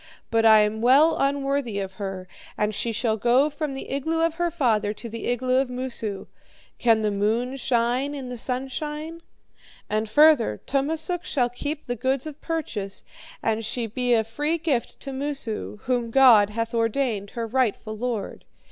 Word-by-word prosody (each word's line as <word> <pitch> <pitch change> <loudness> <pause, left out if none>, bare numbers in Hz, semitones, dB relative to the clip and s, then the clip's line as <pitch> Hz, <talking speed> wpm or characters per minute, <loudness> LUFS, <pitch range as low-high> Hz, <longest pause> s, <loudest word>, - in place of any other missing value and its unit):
But 225 0 +4
I 220 -1 +8
am 210 +1 0
well 275 +7 +5
unworthy 275 -5 0
of 195 -1 -4
her, 190 -2 -5 0.3
and 210 0 0
she 230 +3 -1
shall 220 0 0
go 250 +7 +3
from 295 -2 -4
the 270 - -7
igloo 320 +4 -1
of 330 -1 +2
her 345 - +2
father 225 -10 +1
to 235 - -9
the 230 0 -6
igloo 255 +1 +1
of 265 -1 +1
Moosu. 245 -5 -4 0.5
Can 225 -2 +3
the 210 - +1
moon 225 +6 0
shine 255 +2 0
in 265 -3 -6
the 250 - -5
sunshine? 300 +6 -4 0.7
And 215 0 0
further, 290 - +5
Tummasook 320 +6 -1
shall 265 -9 0
keep 290 +5 -5
the 245 - -2
goods 260 +3 -1
of 305 -1 -8
purchase, 225 - -3 0.4
and 225 0 0
she 230 +2 -2
be 245 +2 +1
a 220 - +2
free 295 +9 -1
gift 300 -7 -2
to 275 - -6
Moosu, 270 -7 -4
whom 245 -2 0
God 230 -5 +6
hath 230 +2 -3
ordained 225 -3 0
her 230 - -1
rightful 225 -2 -1
lord. 235 -2 -4
245 Hz, 170 wpm, -25 LUFS, 220-280 Hz, 0.7 s, I